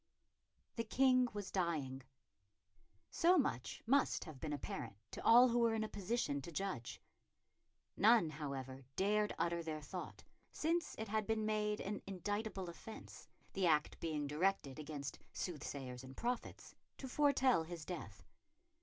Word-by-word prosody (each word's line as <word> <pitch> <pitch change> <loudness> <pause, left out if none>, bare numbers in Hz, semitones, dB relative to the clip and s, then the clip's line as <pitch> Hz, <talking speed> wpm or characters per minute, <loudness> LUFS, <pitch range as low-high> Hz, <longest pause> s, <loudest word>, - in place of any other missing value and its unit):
The 230 - +1
King 255 +2 +4
was 205 -2 -5
dying. 155 -8 -1 1.1
So 355 +2 +5
much 125 - -1
must 275 +4 +3
have 155 -6 -10
been 155 - -3
apparent 120 -6 -4 0.2
to - - -7
all 245 +2 +8
who 240 +1 +2
were 230 -1 +3
in 220 - 0
a - - -2
position 200 -9 -1
to 170 - -8
judge. 165 -9 -3 1.0
None, 215 -5 +5
however, 135 -3 -5
dared 210 +2 +2
utter 170 0 0
their 160 -2 -4
thought, 180 +5 -6 0.3
since 335 +1 0
it 220 -1 -4
had 215 0 0
been 220 -1 +1
made 210 -1 0
an 205 +1 -3
indictable 195 0 -3
offence 195 +6 -10 0.3
the 190 -2 +2
act 155 -2 +2
being 155 -3 -1
directed 150 -2 0
against 145 -2 -5
soothsayers 135 -6 -5
and 130 0 -11
prophets 245 0 -3 0.2
to 265 - -6
foretell 265 - +4
his 160 -1 -6
death. 180 - -6
190 Hz, 145 wpm, -38 LUFS, 150-225 Hz, 1.1 s, all